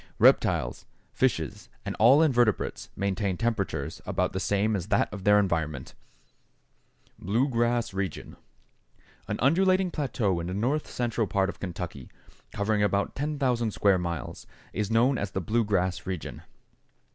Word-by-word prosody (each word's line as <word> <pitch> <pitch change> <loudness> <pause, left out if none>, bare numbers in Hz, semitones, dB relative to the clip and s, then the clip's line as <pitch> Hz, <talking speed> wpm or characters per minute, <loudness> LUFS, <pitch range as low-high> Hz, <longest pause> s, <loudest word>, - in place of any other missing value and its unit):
Reptiles, - - +3 0.3
fishes, 95 - -1 0.2
and - - -3
all 130 +8 +7
invertebrates 120 -8 +1
maintain 100 -1 -1
temperatures 95 -10 -2
about - - -1
the - - -2
same 105 +2 +1
as 90 -2 -3
that - - +1
of 100 -2 -7
their 105 0 +6
environment. 80 -8 -1 1.3
=Blue 115 +9 +1
Grass 120 -3 0
Region.= 95 -4 -4 0.9
An 105 0 -2
undulating 185 +6 +3
plateau 115 - -1
in 85 - -4
the 90 - -3
north 130 +9 -1
central 120 -3 -1
part 95 0 +1
of - - -8
Kentucky, 85 -7 -6 0.4
covering 105 +1 0
about 100 -1 +1
10,000 135 -5 0
square 100 -2 +2
miles, 85 -6 -5 0.3
is 105 -1 -2
known 120 +4 +3
as 100 - -2
the 95 - -3
Blue 110 +7 +1
Grass 95 -4 -1
Region. 95 -4 -5
105 Hz, 140 wpm, -27 LUFS, 95-120 Hz, 1.3 s, all